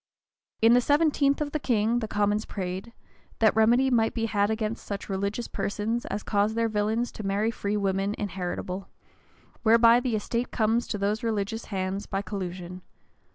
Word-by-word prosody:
[] - - -53
In 225 +1 +7
the 245 - +5
seventeenth 290 0 +2
of 290 -1 -2
the 305 - -1
king, 235 -3 +1
the 220 - -3
commons 210 +1 0
prayed, 190 +3 -5 0.5
"that 220 -2 +3
remedy 240 +4 +4
might 225 -2 +2
be 225 -1 0
had 205 -2 +1
against 220 0 -2
such 200 0 -6
religious 200 +4 -2
persons 220 +4 -2
as 205 - -3
cause 210 +1 +1
their 230 0 +2
villains 220 +2 0
to 215 - -8
marry 205 +3 0
free 205 -2 -2
women 195 +1 0
inheritable, 185 -1 -4 0.7
whereby 230 +1 +6
the 245 -2 -1
estate 235 +3 -2
comes 225 +1 +1
to 210 - -2
those 205 +3 -1
religious 225 -1 -2
hands 190 0 -3
by 195 0 -2
collusion." 185 -2 -6
215 Hz, 170 wpm, -27 LUFS, 200-230 Hz, 0.7 s, In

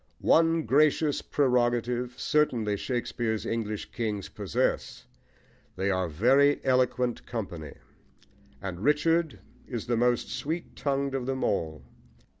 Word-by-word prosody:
One 165 0 +4
gracious 150 +1 +3
prerogative, 125 -2 +1
certainly, 120 -9 +1
Shakespeare's 115 -1 -2
English 110 -2 -3
kings 105 -4 -3
possess: - - -2 0.7
they 95 +2 0
are 95 -1 0
a - - -5
very 135 - +4
eloquent 125 -1 +1
company, 90 - -5 0.9
and 95 -2 -5
Richard 160 +3 +2 0.3
is 120 -4 -4
the 120 -1 0
most 120 0 +2
sweet 165 +4 -4
tongued 140 -1 -1
of 130 -2 -2
them 135 0 -2
all. 80 -8 -1
125 Hz, 115 wpm, -28 LUFS, 110-140 Hz, 0.9 s, One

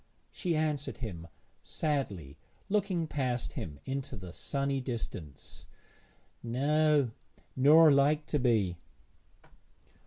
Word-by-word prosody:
She 175 -3 -1
answered 150 -2 -1
him 90 -9 -6 0.3
sadly, 100 - -2 0.3
looking 195 -5 +1
past 130 -6 -2
him 75 -3 -6
into 135 -1 -4
the 90 -3 -9
sunny 140 +3 -1
distance 105 - -7 0.7
'No, 145 +2 +2 0.4
nor 150 +4 +7
like 145 +2 +3
to 150 - -1
be.' 110 -9 +2
140 Hz, 95 wpm, -31 LUFS, 110-150 Hz, 0.7 s, nor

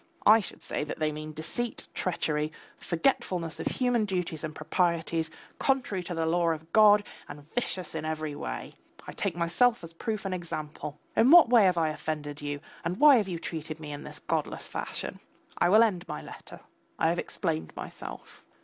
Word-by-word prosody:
I 220 +2 +8
should 200 - -7
say - - -2
that 150 - -5
they 155 -1 0
mean 155 +1 -6
deceit, 190 +10 -4
treachery, 155 -4 -1 0.2
forgetfulness 180 - 0
of - - -2
human 245 -3 +1
duties 180 -5 -2
and 155 -1 -4
proprieties, 165 0 0 0.3
contrary 255 -8 +1
to 175 - -4
the 165 0 0
law 170 +1 +2
of 160 0 -4
God 210 -1 +7 0.3
and 145 0 -10
vicious 190 -7 -2
in 160 -1 -3
every 155 -1 -3
way. - - -5 0.3
I - - -6
take 195 -4 -2
myself 175 +7 +2
as 165 - -8
a - - -24
proof 215 +3 -3
and 190 - -1
example. 155 -4 -5 0.2
In 235 - +5
what 335 -5 +9
way 230 -5 +7
have 180 -2 +3
I 160 -2 +2
offended 150 -1 -4
you 145 0 -4 0.2
and 175 +3 -2
why 295 -3 +8
have 210 -4 +1
you 175 - -2
treated 160 -1 -5
me 150 -2 -7
in 145 0 -6
this - - -6
godless - - -2
fashion? - - -4 0.4
I 175 - +4
will 215 +4 +7
end 190 -6 0
my - - -4
letter. - - -11 0.4
I - - +3
have - - 0
explained 80 0 -2
myself. - - -8
170 Hz, 190 wpm, -29 LUFS, 155-205 Hz, 0.4 s, what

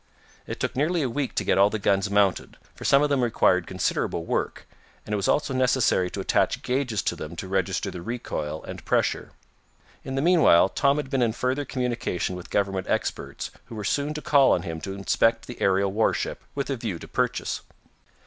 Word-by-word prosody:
It - - -5
took - - -2
nearly 155 +4 +1
a 130 - 0
week 140 0 -2
to - - 0
get - - +2
all 100 +1 +6
the 110 - -2
guns 100 0 +1
mounted, 100 -2 +1 0.2
for - - -11
some 140 +1 +5
of 150 - +2
them 140 -2 +2
required 95 -6 +2
considerable 95 0 -1
work, - - -2 0.4
and 105 - -4
it - - +3
was 100 -1 -1
also 140 -2 +1
necessary 125 -7 +2
to - - -6
attach - - +1
gauges 125 -5 -1
to - - -1
them 80 +2 -7
to 95 - -6
register 95 -1 -1
the 90 - -7
recoil 80 -8 -4
and - - -8
pressure. - - 0 0.7
In 135 - -5
the 135 - 0
meanwhile 160 - +5
Tom 140 +6 +2
had 145 -3 -4
been 135 -2 +1
in 115 -2 +2
further 130 +4 -1
communication 120 -9 -2
with 90 0 -9
government 95 -2 -1
experts - - -2
who 115 - -10
were 105 - -5
soon 145 +8 -1
to 150 - -5
call 140 -2 +5
on 85 - 0
him 80 -1 -5
to 95 - -5
inspect 115 +3 +1
the 125 - -10
aerial 95 0 +2
warship, 110 +3 0
with 140 0 -2
a 135 - -1
view 110 -7 -3
to - - -10
purchase. - - -1
115 Hz, 205 wpm, -25 LUFS, 95-135 Hz, 0.7 s, all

